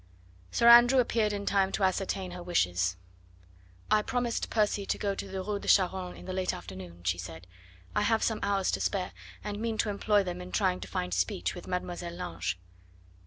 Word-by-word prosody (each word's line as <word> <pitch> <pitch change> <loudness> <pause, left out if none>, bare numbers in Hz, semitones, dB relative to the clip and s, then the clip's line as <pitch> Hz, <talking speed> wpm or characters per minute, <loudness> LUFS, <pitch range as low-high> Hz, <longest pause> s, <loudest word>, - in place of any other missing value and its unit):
Sir 235 - +2
Andrew 240 +2 +9
appeared 225 -3 +2
in 200 -1 -3
time 195 -1 +2
to 200 - 0
ascertain 190 0 0
her 180 0 -7
wishes. 90 - +1 0.9
"I 215 - +5
promised 245 +1 -1
Percy 210 -2 +1
to - - -1
go 200 -1 -1
to 195 - -5
the 190 0 -4
Rue 205 +1 -2
de - - -9
Charonne 185 -1 +2
in - - -11
the 185 - -4
late 185 0 -1
afternoon," 90 -1 -9
she 90 0 0
said. 85 -1 -8 0.5
"I - - +3
have 220 +1 +2
some 220 -2 +1
hours 200 -2 +1
to - - -2
spare, 185 -3 -1 0.3
and 205 0 -4
mean 225 0 -2
to 215 - +1
employ 205 0 +2
them 180 -1 -5
in 180 0 -8
trying 90 - +1
to 95 - -7
find 90 -1 -3
speech 90 -1 0
with 175 - -9
Mademoiselle 175 -1 -4
Lange." 175 - -3
190 Hz, 200 wpm, -30 LUFS, -, 0.9 s, Andrew